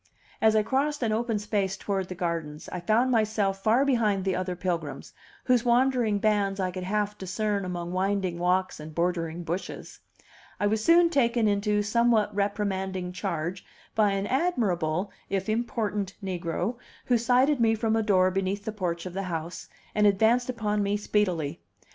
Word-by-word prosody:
As 220 0 +4
I 215 - +4
crossed 280 +4 0
an 225 - +1
open 225 0 0
space 205 -2 -1
toward 195 -2 -2
the 185 - -5
gardens 165 -4 -3
I 180 - -3
found 220 +8 +2
myself 210 -4 +1
far 235 +6 +4
behind 215 -8 +1
the 190 - +1
other 185 0 -2
pilgrims, 170 -5 -4 0.3
whose 250 -2 +3
wandering 245 -3 +2
bands 200 -2 +1
I 185 -1 0
could 180 0 -5
half 210 +1 -1
discern 200 +2 -1
among 175 -1 -4
winding 185 -1 -1
walks 185 +1 +1
and 155 0 -9
bordering 170 -1 -1
bushes. 170 +3 -5 0.6
I - - +1
was 215 +1 +1
soon 335 +2 +5
taken 235 -6 +2
into 210 0 +1
somewhat 230 0 +2
reprimanding 190 -2 -2
charge 180 -1 -3 0.3
by 210 -2 +3
an 195 0 -1
admirable, 200 - 0 0.2
if 195 -1 -1
important, 215 -3 -2
negro, 180 +4 -2 0.3
who 245 -2 +3
sighted 255 +4 +3
me 225 -1 +4
from 220 0 0
a 225 - +2
door 185 -3 +3
beneath 195 +2 -2
the 220 - -2
porch 180 -5 -3
of 180 - -6
the 195 +1 -3
house, 165 +1 -5 0.2
and 210 0 +4
advanced 225 +5 +3
upon 210 -4 -1
me 200 +1 +1
speedily. 180 -7 -1
200 Hz, 165 wpm, -27 LUFS, 185-220 Hz, 0.6 s, soon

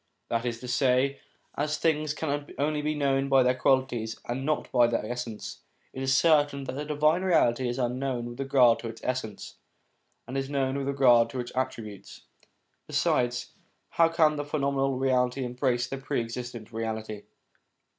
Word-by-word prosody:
That 115 +1 -1
is 115 -1 -3
to 125 - -7
say, 130 +2 +2 0.4
as 150 +1 -1
things 155 -1 0
can 145 -2 -3
only 150 +1 0
be 150 +1 -1
known 135 -1 +1
by 135 -1 +5
their 125 0 +3
qualities 130 -4 0
and 125 +3 -3
not 150 +2 -1
by 120 -2 +5
their 115 -2 -1
essence, 120 -2 -6 0.3
it 130 - -6
is 130 -1 +2
certain 145 -3 +3
that - - -4
the 145 +3 -4
Divine 150 +3 +2
Reality 130 -9 +2
is 120 - -3
unknown 125 0 -1
with 120 +1 -8
regard 135 -4 +4
to 115 - -6
its 115 0 -9
essence, 125 -5 -4 0.7
and 130 - -6
is 135 0 -4
known 135 -2 0
with 140 -1 -2
regard 125 -4 +4
to 125 - -5
its 120 0 -5
attributes. 110 -6 -5 0.7
Besides, 120 0 0 0.4
how 165 -1 +4
can 155 -2 +3
the 145 - -2
phenomenal 140 -2 0
reality 130 0 +1
embrace 125 0 0
the 135 +2 -6
Pre 135 0 -2
existent 120 -1 -6
Reality 110 -2 -4
130 Hz, 170 wpm, -27 LUFS, 120-140 Hz, 0.7 s, by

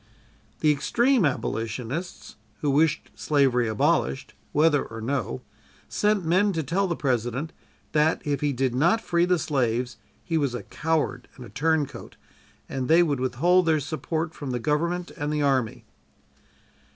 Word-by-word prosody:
The 155 - +5
extreme 235 - +2
Abolitionists, 125 - -3 0.3
who 145 - +1
wished 150 +2 +1
slavery 135 -5 +2
abolished, 105 -10 0 0.2
whether 150 -1 +3
or 115 - -8
no, 115 - -3 0.4
sent 210 -3 +1
men 190 +5 +3
to 160 -2 -1
tell 185 +8 0
the 170 - -1
President 130 +3 -1 0.4
that 155 +1 +2
if 145 -1 -1
he 145 -1 +1
did 130 -1 0
not 170 - +3
free 175 -5 +1
the 180 0 +2
slaves 125 -5 -1 0.3
he 160 +8 0
was 140 -4 -1
a 120 - -5
coward 160 0 -2
and 125 - -10
a - - -12
turncoat, 155 +1 -1 0.5
and 130 -1 -3
they 165 +2 +6
would 145 -5 0
withhold 170 +8 +2
their 160 -1 +3
support 155 +2 -3
from 145 - -6
the 125 -1 -2
Government 170 +7 -1
and 145 +1 -2
the 150 -1 0
Army. 130 -5 0
150 Hz, 150 wpm, -25 LUFS, 130-165 Hz, 0.5 s, they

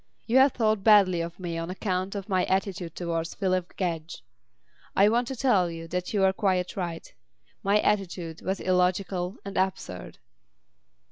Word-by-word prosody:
You 235 +3 +2
have 265 0 +6
thought 215 -4 +1
badly 195 -5 +5
of 170 +2 -6
me 170 -2 -4
on 165 +1 -4
account 185 0 -2
of 195 -1 -5
my 185 -3 +1
attitude 190 -3 -2
towards 165 -1 -3
Phyllis 185 -2 0
Gedge. 165 -6 -3 0.7
I 200 - +6
want 240 +2 +1
to 265 - -4
tell 210 -9 +2
you 165 0 -7
that 180 +1 -3
you 205 - +1
were 190 0 +4
quite 190 -4 0
right. 170 -4 -5 0.5
My 200 +2 +3
attitude 175 -5 -1
was 190 +1 -2
illogical 180 0 0
and 200 - -5
absurd." 90 - -3
185 Hz, 160 wpm, -27 LUFS, 170-200 Hz, 0.7 s, have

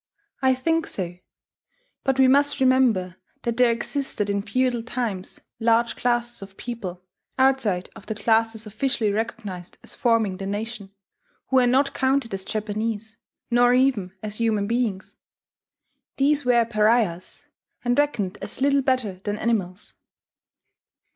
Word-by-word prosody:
I 260 -1 +4
think 325 +5 0
so 180 -2 -5 0.8
but 270 -1 +1
we 265 -1 +6
must 285 +2 +3
remember 245 -9 +3 0.3
that 235 -1 -2
there 250 -1 +5
existed 230 -3 -2
in 200 0 0
feudal 250 +2 0
times 225 -6 -4 0.2
large 230 +1 +2
classes 240 -1 -1
of 195 0 -11
people, 190 -7 -6 0.3
outside 260 -9 +2
of - - -13
the 220 - -3
classes 225 +1 +1
officially 220 0 0
recognized 205 -4 -4
as - - -8
forming 225 -6 +1
the 195 0 -5
nation, 205 0 -5 0.6
who 265 - +3
were 250 -1 +5
not 270 +3 +2
counted 265 -4 +1
as 190 -1 -4
Japanese, 215 +1 -3 0.3
nor 245 +1 +5
even 250 -8 +2
as 210 0 -5
human 220 -3 +1
beings: 225 -3 -2 1.0
these 285 +1 +2
were 240 -2 +4
pariahs, 215 -5 +1 0.4
and 245 +3 +2
reckoned 215 -10 0
as - - -6
little 280 +1 +3
better 255 -8 0
than 205 0 -2
animals. 205 -5 -2
230 Hz, 135 wpm, -24 LUFS, 205-255 Hz, 1.0 s, we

